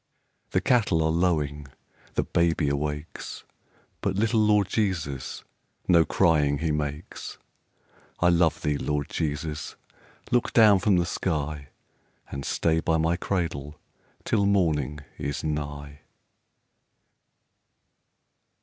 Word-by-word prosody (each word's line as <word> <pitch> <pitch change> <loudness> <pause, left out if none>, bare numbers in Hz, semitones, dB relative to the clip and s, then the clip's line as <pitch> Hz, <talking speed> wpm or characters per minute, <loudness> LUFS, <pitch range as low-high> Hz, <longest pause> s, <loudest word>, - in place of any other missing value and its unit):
The - - +1
cattle 105 -10 +2
are 80 - +2
lowing, 75 -4 0 0.5
the - - +2
baby 85 -3 +1
awakes, 75 +2 -4 0.6
But 100 -2 -1
little 110 +3 +2
Lord 105 -2 +4
Jesus, 85 - -2 0.4
no 85 -3 +5
crying 75 -6 +3
he 80 +2 -1
makes. 75 +1 -4 0.8
I 85 - +4
love 85 -2 +2
thee, 75 -1 0
Lord 75 0 -2
Jesus! 75 -1 -3 0.6
Look 120 0 +1
down 105 -4 +7
from 100 -2 +3
the 85 - +2
sky, 75 -5 -2 0.6
And 70 0 -5
stay 80 -1 +1
by 80 0 +1
my 80 +1 +1
cradle 80 -6 -3 0.4
till 100 -2 +1
morning 75 -8 +1 0.2
is 70 0 -3
nigh. 75 -1 -4
80 Hz, 110 wpm, -26 LUFS, 75-90 Hz, 0.8 s, down